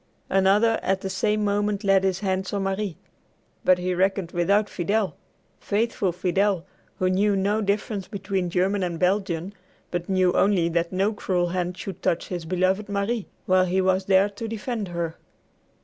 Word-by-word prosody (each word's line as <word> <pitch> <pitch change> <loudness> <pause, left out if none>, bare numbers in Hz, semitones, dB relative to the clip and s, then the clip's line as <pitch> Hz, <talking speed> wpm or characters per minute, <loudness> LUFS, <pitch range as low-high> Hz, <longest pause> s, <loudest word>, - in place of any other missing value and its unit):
Another 200 +4 +4
at 190 0 0
the 190 - -4
same 210 +2 0
moment 205 0 0
laid 195 -1 +4
his 190 0 0
hands 190 -1 -1
on 200 -1 0
Marie. 195 -2 -2 0.7
But 185 - +5
he 180 0 -1
reckoned 190 -1 0
without 200 +5 +2
Fidel, 200 +3 -1 0.4
faithful 210 -2 0
Fidel, 185 +1 0 0.3
who 185 - +1
knew 200 +2 +2
no 200 +3 +1
difference 200 -1 -1
between 195 -3 -2
German 190 +3 +1
and 175 -2 -2
Belgian, 185 0 0 0.4
but 175 0 -3
knew 185 -1 +3
only 190 -4 +3
that 170 0 0
no 195 +4 +1
cruel 180 -4 0
hand 180 0 -2
should 190 -3 -7
touch 170 - 0
his 175 -3 -4
beloved 185 +4 0
Marie, 205 +2 -1 0.2
while 185 0 +4
he 185 +1 0
was 190 0 +2
there 195 +1 +4
to 205 +3 -6
defend 225 -1 -3
her. 170 -2 -4
190 Hz, 165 wpm, -25 LUFS, 180-205 Hz, 0.7 s, But